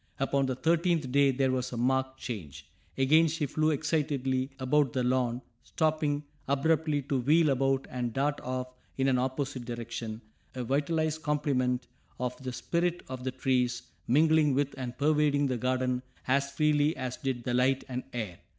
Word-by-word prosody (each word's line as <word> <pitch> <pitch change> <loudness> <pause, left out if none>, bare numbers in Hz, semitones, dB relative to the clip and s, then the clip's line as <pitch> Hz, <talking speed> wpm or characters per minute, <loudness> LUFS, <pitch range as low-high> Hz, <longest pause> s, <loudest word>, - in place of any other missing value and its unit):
Upon 135 0 +1
the 130 - -1
thirteenth 165 0 +1
day 140 +1 +5
there 135 0 +1
was 130 -1 -1
a 120 - -5
marked 130 +2 0
change. 75 - -7 0.3
Again 155 +5 +5
she 160 0 -1
flew 155 +3 +1
excitedly 140 -4 0
about 135 0 +2
the 130 - 0
lawn, 125 -1 0 0.2
stopping 155 -2 0 0.2
abruptly 150 +1 +1
to 135 0 -1
wheel 155 +4 +4
about 135 0 +1
and 125 -1 -3
dart 145 +4 0
off 130 0 -3 0.3
in 135 0 +2
an 130 -2 +3
opposite 130 0 -2
direction, 115 -2 -5 0.4
a 125 - -3
vitalized 155 +4 0
complement 135 -5 0 0.3
of 125 0 -2
the 130 -1 -4
spirit 170 +7 -1
of 130 -1 -6
the 130 - -1
trees, 125 -2 0 0.2
mingling 155 +1 +4
with 140 0 0
and 125 -2 -6
pervading 145 -1 +3
the 130 -2 0
garden 125 0 0 0.3
as 140 +2 +2
freely 150 +1 +2
as 130 -1 -4
did 130 -3 -3
the 125 - -2
light 130 +2 +2
and 125 -1 -3
air. 105 -8 -5
135 Hz, 165 wpm, -29 LUFS, 125-150 Hz, 0.4 s, day